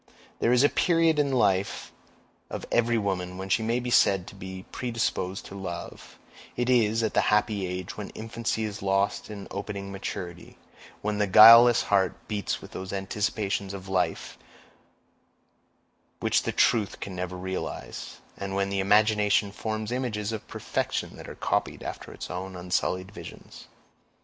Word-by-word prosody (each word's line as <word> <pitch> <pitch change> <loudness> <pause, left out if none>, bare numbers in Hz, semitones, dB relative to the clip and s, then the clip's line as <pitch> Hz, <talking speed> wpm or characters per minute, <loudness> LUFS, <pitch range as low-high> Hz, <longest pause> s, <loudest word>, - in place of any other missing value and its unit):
There 115 - +2
is 125 +1 +5
a - - +7
period 165 -3 +3
in 145 -1 +2
the 135 - 0
life 95 -5 +1 0.6
of - - -5
every 120 0 +3
woman 90 -3 -2
when 95 +1 -6
she 110 - +2
may 115 +2 0
be 125 0 -4
said 95 -6 +4
to - - -14
be 95 -1 -8
predisposed 115 -6 -2
to 100 - -9
love; 85 -3 -7 0.4
it 120 +1 +1
is 115 -2 +3
at 110 - 0
the - - +4
happy 105 -2 +1
age 90 0 -5
when 105 - -5
infancy 115 0 -3
is 105 -1 -4
lost 100 +1 0
in 100 -2 -7
opening 100 0 -5
maturity—when 95 +2 -7
the 105 - +2
guileless 115 +4 +9
heart 95 -3 +2
beats 105 -2 -3
with - - -11
those 95 0 -6
anticipations 100 0 -2
of 95 -1 -9
life 95 -1 -1 1.8
which - - +2
the - - -2
truth 105 -4 +2
can 95 -2 -6
never 90 0 -4
realize—and 95 +1 -6
when 100 0 0
the 100 - 0
imagination 105 0 +3
forms 110 +1 -4
images 115 -4 -2
of 110 -2 -6
perfection - - -3
that - - -10
are - - -8
copied - - -1
after - - -7
its - - -7
own 95 +1 -5
unsullied 90 +1 -1
visions. 85 -5 -11
100 Hz, 155 wpm, -27 LUFS, 95-110 Hz, 1.8 s, guileless